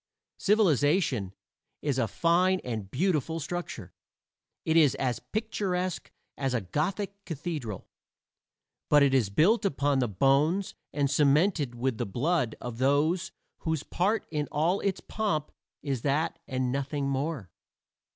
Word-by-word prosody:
Civilization, 150 - +2 0.5
is 140 -3 0
a 115 - +2
fine 180 - +2
and 110 -6 -4
beautiful 160 - 0
structure. 155 - -5 0.7
It 160 - +1
is 150 -6 +5
as 125 -3 -1
picturesque 190 -5 -2 0.3
as 135 -2 0
a 115 - 0
Gothic 195 - -3
cathedral, 145 - -5 1.0
but 145 -1 +6
it 140 -1 +3
is 125 -7 +3
built 185 - +3
upon 145 -6 +1
the 125 - +1
bones 140 - +2 0.2
and 140 -1 +1
cemented 145 0 +2
with 120 -1 -1
the 120 - -1
blood 125 - 0
of 120 -1 -6
those 155 +7 +2 0.3
whose 160 -3 -2
part 205 +5 0
in 150 -2 -1
all 165 +6 +1
its 195 -2 -1
pomp 160 -9 -2 0.3
is 135 -5 -2
that 145 +4 0
and 130 -2 -1
nothing 140 +1 -2
more. 135 - -2
145 Hz, 130 wpm, -28 LUFS, 130-175 Hz, 1.0 s, but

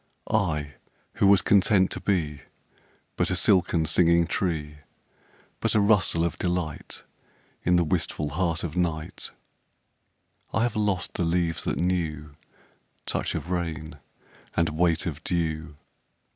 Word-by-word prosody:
I 75 -9 0 0.4
who 100 - +4
was 100 -1 +6
content 95 -1 +4
to - - -3
be 85 -7 -1 0.8
But - - +1
a - - 0
silken 90 -3 +3
singing 85 +1 +4
tree, 80 -6 -2 0.8
But - - 0
a - - +5
rustle 100 -5 +3
of 85 - -3
delight 90 -4 -3 0.6
In 90 - +3
the 85 - +4
wistful 75 -1 -1
heart 85 +1 -1
of 80 -3 -4
night 80 -3 -2 1.3
I 110 - +3
have 120 -2 0
lost 105 -4 0
the - - -1
leaves 85 0 0
that - - -1
knew 80 -5 -2 0.7
Touch - - -2
of 85 - -4
rain 80 -3 -3 0.6
and 85 0 +3
weight 85 +1 +1
of 80 -2 -4
dew. 80 -3 -2
85 Hz, 130 wpm, -26 LUFS, 80-90 Hz, 1.3 s, was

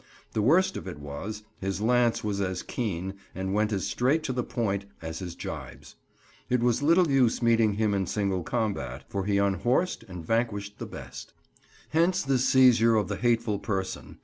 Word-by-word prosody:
The 110 - +1
worst 185 - +3
of - - -7
it 90 - -6
was, 75 +10 -6 0.2
his 95 0 -2
lance 120 +1 +2
was 100 -2 -1
as 95 -2 -2
keen, 95 -5 -3 0.2
and 95 0 -2
went 105 +1 +1
as 100 -3 -1
straight 140 +6 +1
to 130 - -2
the 125 -1 -1
point, 100 -5 -2
as 80 0 -6
his 90 -3 -6
gibes. - - -8 0.6
It 125 -1 +2
was 120 +1 +2
little 170 +4 +4
use 125 -3 +3
meeting 115 -2 +4
him 105 0 +1
in 95 -2 0
single 100 -3 0
combat, 85 - -2
for 100 -1 -2
he 100 -1 +1
unhorsed 120 - +1
and 90 -4 -8
vanquished 105 -1 -1
the - - -5
best. - - -9 0.6
Hence 175 +4 +2
this 135 -2 +1
seizure 120 -3 +6
of 105 -4 +1
the 100 - -2
hateful 115 -3 +1
person. 95 -3 -4
105 Hz, 180 wpm, -27 LUFS, 95-125 Hz, 0.6 s, seizure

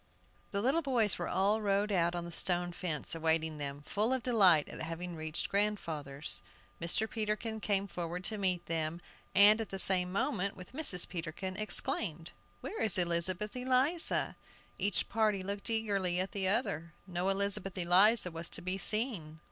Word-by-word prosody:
The 200 0 -3
little 275 +7 +2
boys 240 - +3
were 175 - -3
all 205 +3 +1
rowed 205 0 0
out 175 -2 +1
on 175 -1 -4
the 170 - -8
stone 175 +1 +1
fence, 170 -3 -2
awaiting 160 -1 0
them, 140 0 -6
full 210 - -1
of 260 -3 -2
delight 190 - +4
at - - -9
having 165 +2 -6
reached 155 0 -4
grandfather's. 160 -9 -2 0.4
Mr. 170 +6 +1
Peterkin 220 0 -3
came 200 -2 0
forward 175 -1 -5
to 215 +3 -2
meet 185 -3 0
them, 160 0 -2 0.4
and, 210 +2 +7
at 220 - -6
the 195 - -5
same 180 -1 +5
moment 200 -2 -1
with 185 +5 -12
Mrs. 260 - +5
Peterkin, 180 +2 -6
exclaimed: 175 -5 0 0.3
"Where 440 - -6
is 210 -2 +3
Elizabeth 175 +4 -1
Eliza?" 260 +6 +1 0.4
Each 200 0 -1
party 215 -3 0
looked 200 +3 -4
eagerly 200 -5 0
at 190 +1 -2
the 195 -2 -1
other; 170 - -1
no 180 0 -2
Elizabeth 195 -1 0
Eliza 185 +3 +4
was 165 +1 -4
to - - -2
be 185 +2 -3
seen. 205 -8 0
190 Hz, 165 wpm, -32 LUFS, 170-210 Hz, 0.4 s, and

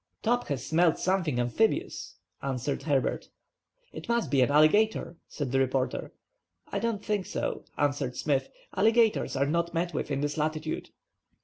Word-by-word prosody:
"Top 245 +2 +1
has 135 -3 -3
smelt 165 0 +3
something 175 -9 0
amphibious," 120 - 0 0.3
answered 135 +1 -2
Herbert. 140 -4 0 0.6
"It - - -9
must 235 -1 +1
be 135 -2 +4
an 125 - +4
alligator," 165 +6 +3
said 140 -5 -4
the 135 - +2
reporter. 130 0 0 0.6
"I 200 - -1
don't 215 -1 -2
think 205 -3 -1
so," - - -3
answered 140 -3 0
Smith. 140 -3 0 0.3
"Alligators 225 -5 +3
are 135 +1 +2
not 170 +3 -1
met 175 +1 -1
with - - -3
in 140 -1 -1
this 145 +2 -2
latitude." 155 +1 -2
155 Hz, 150 wpm, -28 LUFS, 140-195 Hz, 0.6 s, be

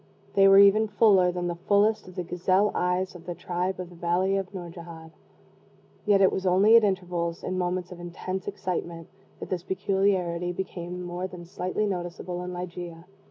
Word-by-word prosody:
They 195 0 +6
were 195 0 +7
even 200 +2 +6
fuller 200 -4 +4
than 175 0 -3
the 175 - -1
fullest 205 0 +3
of 185 - -12
the 180 - -3
gazelle 185 +4 +1
eyes 180 +1 0
of 175 -1 -13
the 175 - -4
tribe 180 +2 -3
of 180 -1 -6
the - - -13
valley 175 +3 +1
of 195 -1 -3
Nourjahad. 170 -3 -9 1.0
Yet 200 -1 +5
it 190 - +5
was 190 - -3
only 195 +5 +5
at 230 - +7
intervals 180 -4 -1
in 185 - -3
moments 180 0 -2
of 180 - -9
intense 180 +2 -5
excitement 175 -4 -4 0.3
that - - -7
this 180 -2 -1
peculiarity 185 -2 0
became 180 -1 -5
more 175 +1 -4
than 180 -2 -10
slightly 185 +4 -2
noticeable 180 -2 -4
in 180 - -5
Ligeia. 175 -1 -7
180 Hz, 180 wpm, -26 LUFS, 175-190 Hz, 1.0 s, were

